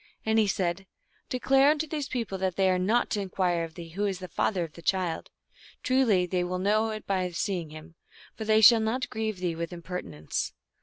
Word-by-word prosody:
And 220 0 +3
he 215 - +3
said, 185 0 -1 0.2
" - - -39
Declare 270 +2 +4
unto 305 +1 +1
these 295 -2 -3
peo 245 -4 -2
ple 190 -2 -6
that 185 -2 -1
they 190 -1 +3
are 185 - +1
not 220 +7 +1
to 205 - 0
inquire 180 -3 0
of 165 -1 -7
thee 170 -2 -8
who 200 +5 -2
is 195 -2 -2
the 185 0 -7
father 180 +2 0
of 160 -2 -7
thy 170 - -12
child; 180 -2 -1 0.5
truly 245 -9 +3
they 180 0 -1
will 175 +1 -3
all - - 0
know 215 +4 +2
it 215 -1 -6
by 185 -2 0
see 180 +2 -1
ing 165 -3 -8
him, 155 +2 -11 0.4
for 220 - -5
they 215 0 +4
shall 230 +2 +9
not 225 +4 -1
grieve 220 -2 -2
thee 180 -2 -2
with 165 0 -4
imperti 180 +1 -6
nence." 75 -2 -4
190 Hz, 240 wpm, -28 LUFS, 175-220 Hz, 0.5 s, shall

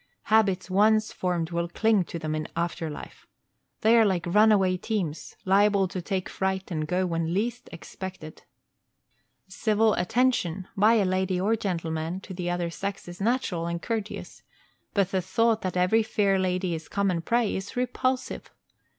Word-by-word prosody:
Habits 195 -4 +3
once 215 +3 +3
formed 175 -2 -2
will 170 0 -1
cling 215 +1 +2
to 170 - -6
them 155 -2 -3
in 155 0 -3
after 170 -1 -2
life. 150 - -10 0.5
They 225 +2 +5
are - - +6
like 190 -5 +1
runaway 200 0 +4
teams 180 -6 -3
liable 200 0 +4
to 185 - -4
take 185 +1 -2
fright 190 0 -2
and 155 -2 -2
go 180 +3 +1
when 165 -1 -1
least 235 +4 -2
expected. 175 -1 -8 1.1
Civil 215 +2 +2
attention, 190 -5 0
by 215 +4 +5
a 210 -3 +3
lady 185 0 0
or 210 +5 +2
gentleman, 165 -4 -3
to 190 - -9
the 175 -1 -3
other 175 -1 -1
sex 195 +2 -5
is 175 +2 -9
natural 200 -7 0
and 170 0 -2
courteous, 220 +2 -5 0.5
but 200 -2 +2
the 190 - +1
thought 225 +5 +1
that 185 -1 -3
every 185 +5 +4
fair 200 -3 +1
lady 185 -1 0
is 160 -1 -6
common 195 -4 0
prey 235 +3 +1
is 190 +1 -5
repulsive. 255 +1 -1
190 Hz, 160 wpm, -26 LUFS, 175-215 Hz, 1.1 s, are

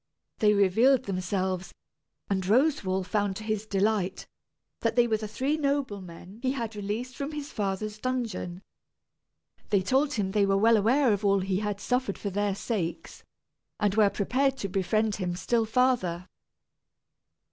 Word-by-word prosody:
They 210 -2 +4
revealed 230 +7 +4
themselves, 185 -1 -2 0.6
and 195 -1 0
Roswal 205 - +2
found 205 -1 0
to 215 - -7
his 215 -1 -2
delight 200 -1 0 0.5
that 225 -1 0
they 240 -1 +5
were 220 -2 +1
the 215 0 -5
three 265 +8 -1
noblemen 205 - -3
he 260 0 0
had 230 -5 -4
released 215 +5 -4
from 285 +2 -4
his 295 0 -6
father's 210 +1 -3
dungeon. 220 -7 -3 1.1
They 200 -3 +2
told 275 +7 +2
him 195 -4 -1
they 200 -1 +2
were 195 0 +3
well 225 +3 +5
aware 235 +4 +3
of 205 +1 -2
all 200 -1 +3
he 190 0 -1
had 205 -1 -3
suffered 250 -3 -1
for 200 - -4
their 205 0 0
sakes, 195 -5 -4 0.6
and 205 -2 +2
were 210 -1 +5
prepared 265 +7 0
to 200 -6 -4
befriend 210 +3 0
him 180 -3 -2
still 225 +6 +1
farther. 220 -7 +1
210 Hz, 155 wpm, -28 LUFS, 195-245 Hz, 1.1 s, they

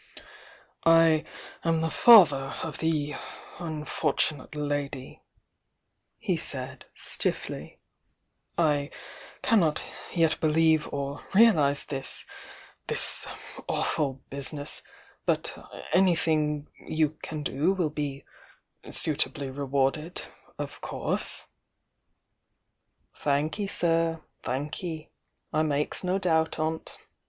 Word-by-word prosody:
"I 165 -1 +5 0.4
am 165 -1 +2
the 160 0 0
father 150 - +7
of 160 -2 -5
the 150 -3 0 0.5
unfortunate 155 -3 -1
lady," 145 -3 -3 1.0
he - - -1
said - - -3
stifiBy. - - -2 0.8
"I 150 -4 +2 0.5
cannot 170 -10 +3 0.3
yet 165 -3 +2
believe 160 0 +3
or 140 0 -3
realise 160 -11 +5
this; 135 -1 -3 0.6
this - - -2 0.4
awful 135 -3 0
business; 140 +1 +2 0.5
but - - 0 0.4
anything 155 -5 +2
you 155 -2 0
can 155 -1 -5
do 145 +6 +1
will 180 -6 0
be 145 -2 -4 0.6
suitably 145 -2 -1
rewarded 140 +4 -1 0.2
— - - -29
of - - -6
course - - -3 0.8
" - - -48
"Thanky, 150 +8 0
sir, 165 -2 +3 0.2
thanky! 155 +4 -4 0.4
I 155 - +3
makes 150 +1 -1
no 185 +1 +1
doubt 160 -4 +1
on't! 160 +1 -3
155 Hz, 90 wpm, -28 LUFS, 145-165 Hz, 1.0 s, father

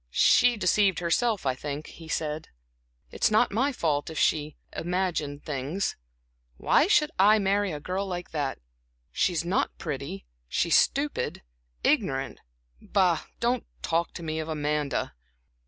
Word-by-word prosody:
"She 245 - +4
deceived 195 -1 +3
herself, 195 +3 +1
I 130 - +2
think," 145 +3 -5
he 165 - -12
said. 155 -1 -3 0.6
"It's - - +2
not 215 +3 +3
my 260 +8 +1
fault 155 - -1
if 160 - -7
she 150 -1 +1 0.2
imagined 170 -5 -2
things. 150 +7 -2 0.6
Why 310 - +3
should 300 -7 +3
I 210 +3 +7
marry 200 -1 +1
a 150 - -4
girl 185 +5 -3
like 180 -1 -5
that? 145 -4 -2 0.5
She's 170 -2 0
not 180 +3 0
pretty, 140 - -5 0.2
she's 170 - +2
stupid, 280 - +1 0.4
ignorant. 135 0 +1 0.4
Bah, 185 -4 +2
don't 240 0 0 0.2
talk 170 +1 0
to 170 - -7
me 160 0 -3
of 160 0 -4
Amanda." 150 -2 -1
170 Hz, 140 wpm, -27 LUFS, 150-200 Hz, 0.6 s, I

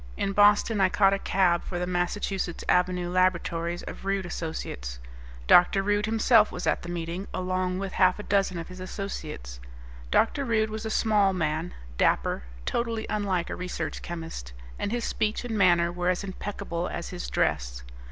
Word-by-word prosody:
In 195 - -1
Boston 205 +1 +4
I 190 - +5
caught 195 -3 +4
a 195 - 0
cab 180 -4 +2
for 175 - -4
the 180 - -1
Massachusetts 180 0 -2
Avenue 180 0 +2
laboratories 175 -1 0
of - - -8
Rude 195 -1 -1
Associates. 65 - -5 0.5
Dr. 180 - +6
Rude 205 +1 +1
himself 220 0 +4
was 180 - -5
at - - +1
the 175 - -8
meeting, 175 +2 -4
along 185 0 -1
with 195 0 -4
half 185 -1 +4
a 210 - -6
dozen 195 -3 +1
of 165 - -5
his 185 0 -10
associates. 155 - -6 0.5
Dr. 275 - +2
Rude 220 -3 +1
was 220 +1 -4
a - - -3
small 210 -3 +3
man, 160 0 -2 0.2
dapper, - - +2 0.2
totally 230 -2 -1
unlike 195 -5 -1
a - - -2
research 180 -3 -4
chemist, 165 - -6 0.3
and - - -2
his 240 0 -1
speech 215 +3 -1
and 230 -2 -3
manner 175 -4 +4
were 175 0 -1
as 180 +2 0
impeccable 185 -3 -4
as - - -5
his - - -5
dress. - - -1
185 Hz, 170 wpm, -27 LUFS, 175-205 Hz, 0.5 s, Dr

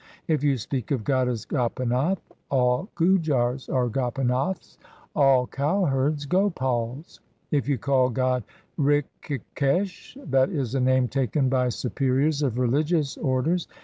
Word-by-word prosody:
3 160 - +1
If 150 -2 0
you 140 -2 +2
speak 125 +1 -4
of 130 -6 -1
God 130 +1 +1
as 120 -4 -3
Gopinath, 130 +6 0 0.3
all 125 - +1
Gujars 150 -8 +1
are 125 -2 +1
Gopinaths, 130 - -2 0.4
all 135 -4 +4
cowherds 145 -1 0
Gopals; 135 - -1 0.3
if 145 -2 0
you 140 - +2
call 135 -2 +2
God 130 -1 0 0.4
Rikhikesh, 145 - -1
that 130 0 +4
is 135 -6 -2
a 135 - +1
name 130 0 +3
taken 135 +1 0
by 125 -1 +2
superiors 135 +4 0
of 130 -5 0
religious 145 +4 +1
orders. 155 +5 0
135 Hz, 130 wpm, -25 LUFS, 125-150 Hz, 0.4 s, all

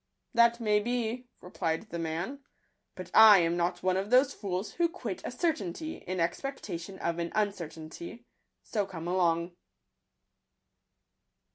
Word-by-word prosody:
— - - -53
" - - -50
That 235 0 +4
may 210 -2 +3
be," 240 +2 -2
replied 180 +2 -3
the 170 - -3
man; 165 - -3 0.3
" - - -49
but 185 -1 -8
I 220 -2 +10
am 170 0 +1
not 175 +1 -1
one 185 0 +2
of 195 +2 -2
those 255 +3 +5
fools 195 0 -4
who 340 0 +1
quit 220 - -5
a - - -3
certainty 310 - -2
in 185 +1 -5
expec 270 +12 -2
tation 180 0 -6
of 170 -1 -2
an 170 0 -2
uncertainty; 175 +1 -4 0.4
so 205 -3 -1
come 170 -3 -7
along." 170 -1 +1
190 Hz, 155 wpm, -30 LUFS, 170-235 Hz, 0.4 s, I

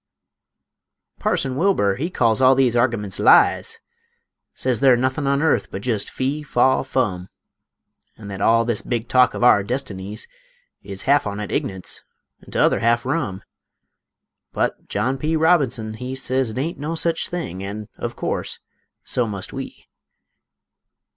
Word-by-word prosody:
Parson 130 -2 0
Wilbur 135 - +2
he 165 +6 -2
calls 115 -7 +2
all 130 0 +6
these 130 -3 +3
argimunts 115 -5 0
lies; - - +4 0.8
Sez 125 -4 0
they're 130 -2 +5
nothin' 130 +3 -1
on 140 +2 +1
airth 160 - +1
but 100 - -7
jest 115 -5 -1
fee, 135 +4 -2
faw, 130 -2 +2
fum; 105 -9 -2 0.9
An' 105 - -10
thet 100 -1 -6
all 115 +2 +4
this 120 -3 0
big 120 -1 -3
talk 125 +1 +4
of - - -3
our 120 -4 +6
destinies 105 -3 -4 0.5
Is 100 -1 -8
half 140 -3 +3
on 100 0 -4
it 105 - -5
ign'ance, 95 -2 -3 0.4
an' - - -16
t'other - - +2
half 120 +1 +2
rum; 130 - -2 1.1
But - - -2
John 130 +1 -1
P. 155 +3 0
Robinson 140 -9 +2
he 125 +4 -6
Sez 130 -1 -1
it 110 - -7
ain't 155 +5 -3
no 155 +3 -3
sech 165 0 0
thing; 165 - -4
an', 105 +2 -6
of - - -4
course, - - -3 0.5
so 125 -2 0
must 100 -3 -5
we. - - -8
125 Hz, 150 wpm, -21 LUFS, 105-135 Hz, 1.1 s, all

